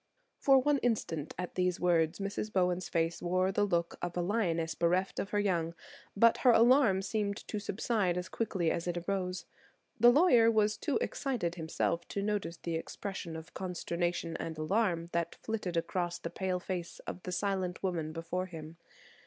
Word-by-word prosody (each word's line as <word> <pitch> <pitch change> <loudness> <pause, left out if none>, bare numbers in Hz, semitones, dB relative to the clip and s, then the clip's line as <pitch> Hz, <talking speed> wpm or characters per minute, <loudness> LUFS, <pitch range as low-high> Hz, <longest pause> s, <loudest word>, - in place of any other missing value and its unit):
For 270 -1 +6
one 280 +2 +3
instant, 170 - -1
at 180 0 -4
these 180 -1 0
words, 170 -2 +2
Mrs. 200 +2 -3
Bowen's 180 -1 +1
face 165 0 0
wore 185 +2 +1
the 205 +1 +2
look 170 -3 -1
of 175 0 -3
a - - +2
lioness 170 -5 0
bereft 180 +3 +1
of 195 - -2
her 205 - 0
young; 170 -5 0 0.4
but 230 +2 +6
her 255 - +4
alarm 235 -4 +5
seemed 205 0 -1
to 210 - -3
subside 205 -3 0
as 180 +1 -3
quickly 190 -6 -1
as 170 - -2
it 175 0 -1
arose. 185 -2 -2 0.5
The 240 +2 +8
lawyer 245 -5 +6
was 215 -1 +3
too 285 +6 -1
excited 240 -12 -1
himself 170 0 -2
to 200 - -3
notice 205 -5 -2
the 170 - -4
expressions 170 0 -5
of 160 0 -11
consternation 175 -2 -2
and 160 -1 -5
alarm 170 0 0
that 170 0 -1
flitted 210 -6 -3
across 175 +1 -1
the 170 - -6
pale 185 -1 -1
face 180 -2 -5
of 180 - -6
the 180 - -5
silent 185 -1 -1
woman 165 -5 -1
before 170 +3 -3
him. 165 -2 -9
180 Hz, 175 wpm, -32 LUFS, 170-205 Hz, 0.5 s, The